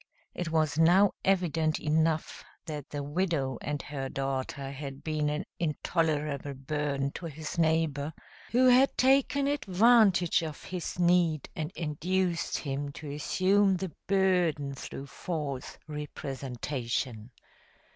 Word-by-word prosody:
It 175 -2 -3
was 160 -1 +1
now 180 +5 +6
evident 165 -5 +1
enough 155 +1 0 0.2
that 150 -3 -6
the 145 -1 -4
widow 145 -4 -1
and 145 0 -2
her 135 -2 -4
daughter 135 0 -3
had 140 0 -7
been 155 -1 0
an 150 +1 -2
intolerable 150 -3 -1
burden 140 0 -2
to 170 - -6
his 155 +1 -6
neighbor, 160 -3 +1 0.4
who 250 +2 +4
had 255 +2 +5
taken 275 +2 +3
advantage 215 - +4
of 155 -3 -6
his 180 -2 -5
need 175 -4 +2
and 155 -1 -3
induced 170 +3 -1
him 140 0 -3
to 145 -1 -7
assume 190 +6 +2
the 185 -1 -4 0.2
burden 180 -7 +2
through 135 0 -7
false 145 -3 -5
representation. 130 -5 -4
155 Hz, 120 wpm, -29 LUFS, 140-180 Hz, 0.4 s, now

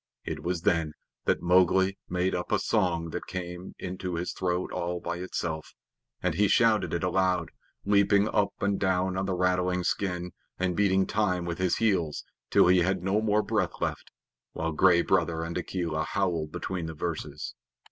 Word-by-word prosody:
It - - -4
was 90 -1 -2
then 80 -3 +1 0.3
that - - +1
Mowgli 95 +2 +4
made 90 +1 0
up 90 - -3
a - - +4
song 85 -3 0
that - - -5
came 90 0 -5
up - - -10
into 90 -1 -4
his 85 +2 -3
throat 90 -1 -1
all 90 +1 -2
by 85 0 -4
itself, 85 -3 -4 0.5
and 90 -2 +1
he 100 +5 +3
shouted 110 -4 +3
it 85 - -1
aloud, 90 -2 +1 0.3
leaping 100 0 +4
up 105 -2 +2
and 100 -1 +1
down 95 -1 +1
on 95 +1 -1
the 95 - 0
rattling 90 0 +1
skin, 90 -1 -1 0.3
and 90 -1 0
beating 95 -1 +3
time 90 -5 0
with 85 0 -4
his 95 -1 +1
heels 90 -9 +1 0.3
till - - +5
he 90 +1 +5
had 90 +1 +1
no 100 +3 +1
more 105 -1 +2
breath - - -1
left, - - -3 0.4
while 80 +1 -2
Gray 85 +2 +4
Brother 85 -3 +1
and 85 +1 -5
Akela 85 -3 -2
howled 85 -4 -1
between 90 -1 -4
the 80 - -6
verses. 75 -5 -4
90 Hz, 175 wpm, -28 LUFS, 85-95 Hz, 0.5 s, till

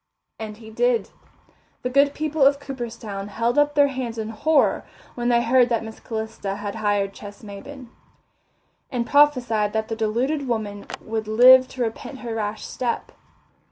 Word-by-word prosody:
And 215 -1 -6
he 220 -1 -12
did. 485 - +1 0.7
The 250 - -1
good 280 +2 +3
people 310 -1 0
of 280 +1 +5
Cooperstown 230 -7 -6
held 230 +5 0
up 290 0 +2
their 285 -1 +5
hands 255 -4 -4
in 220 -1 -3
horror 290 +7 +2 0.3
when 240 0 -1
they 235 -1 +3
heard 245 +1 +4
that 230 -2 0
Miss 220 0 -9
Calista 220 -3 -4
had 205 0 -5
hired 205 -2 0
Ches 205 +1 -11
Maybin, 240 +6 -9 1.0
and 240 -3 -1
prophesied 245 -8 +3
that 220 0 -1
the 225 - -2
deluded 250 +7 -1
woman 210 -4 -3 0.2
would 220 -1 -3
live 255 +4 +7
to 255 -1 -3
repent 235 +4 -5
her 235 -2 -4
rash 215 -1 -3
step. 240 -2 -3
235 Hz, 160 wpm, -23 LUFS, 215-265 Hz, 1.0 s, live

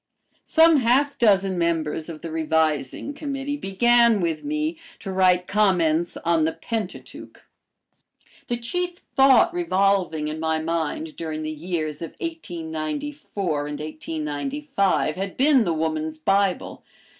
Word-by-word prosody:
Some 325 -1 +6
half 270 +3 +2
dozen 195 -5 +3
members 160 -1 -1
of 155 -2 -8
the 165 - -6
Revising 160 - 0
Committee 285 -1 -4
began 235 0 +3
with 165 -3 -1
me 305 +2 -2 0.2
to 195 - -6
write 185 -1 +3
"Comments 175 -6 +2
on 165 -1 +3
the 160 +1 +1
Pentateuch." 225 -2 -6 1.0
The 240 - -1
chief 355 +9 -4
thought 270 +4 +6
revolving 195 - +1
in 155 +1 -4
my 160 0 0
mind 160 -1 -3
during 155 -1 -4
the 155 - -3
years 155 -1 -4
of 165 - -7
1894 170 - -4
and 150 0 -5
1895 155 - -2
had 195 0 -4
been 270 -3 +4
"The 170 - 0
Woman's 160 -1 -2
Bible." 195 +3 0
180 Hz, 125 wpm, -23 LUFS, 160-240 Hz, 1.0 s, Some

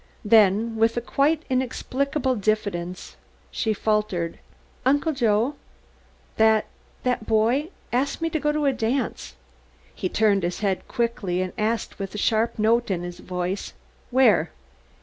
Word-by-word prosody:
Then, 220 +1 +4
with 225 +1 +2
a - - +4
quite 295 +6 +1
inexplicable 260 +1 -1
diffidence 200 -4 -2 0.3
she 220 - -1
faltered, 210 -6 -1 0.4
"Uncle 285 +5 +2
Joe, 235 0 +2 0.8
that 220 -1 +4 0.4
that 250 -3 -1
boy 235 +8 +2 0.2
asked 265 +3 0
me 330 - 0
to 315 - 0
go 295 0 +1
to 300 0 -1
a 275 - +3
dance." 235 - -2 0.6
He 185 - -3
turned 205 -1 +3
his 175 +2 -3
head 195 -3 -1
quickly 235 -7 -1
and 185 - -5
asked 220 0 -2
with 195 +1 -5
a - - -3
sharp 220 +2 +1
note 230 +2 +2
in 180 -3 -1
his 175 0 -7
voice: 180 +2 -4 0.4
"Where?" 225 - +4
220 Hz, 140 wpm, -24 LUFS, 200-255 Hz, 0.8 s, Then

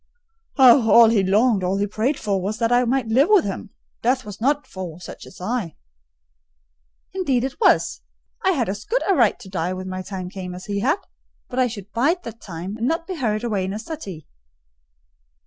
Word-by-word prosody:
"Oh, 250 -3 +7
all 230 0 +8
he 220 -3 +3
longed, 205 +1 +3
all 185 +2 0
he 200 - +1
prayed 220 +8 -1
for, 200 -3 -1
was 205 +4 -3
that 230 0 0
I 245 +1 +4
might 255 +1 +1
live 260 +7 +4
with 415 -5 +5
him! 200 +2 -5 0.3
Death 255 +2 +1
was 205 0 -9
not 285 +4 +1
for 180 -3 -8
such - - -10
as - - -14
I." 190 - -3 1.4
"Indeed 275 -11 0
it 270 +6 -4
was: - - +3 0.4
I 380 - +3
had 255 -8 0
as 200 +2 -4
good - - 0
a 395 - +4
right 240 - +3
to - - -12
die 180 -1 -2
when 185 0 -6
my 185 0 -4
time 185 -2 -6
came 180 -2 -6
as 180 - -9
he 200 -1 -2
had: 280 - +2 0.5
but 255 - -3
I 255 - +4
should 210 -3 -8
bide 315 +10 +1
that 230 0 -9
time, 185 +3 -6
and 230 +2 -1
not 330 +2 -1
be 375 - -5
hurried 215 -5 -1
away 210 -5 -1
in 190 +1 -3
a - - -3
suttee." 215 - -7
220 Hz, 210 wpm, -22 LUFS, 190-255 Hz, 1.4 s, all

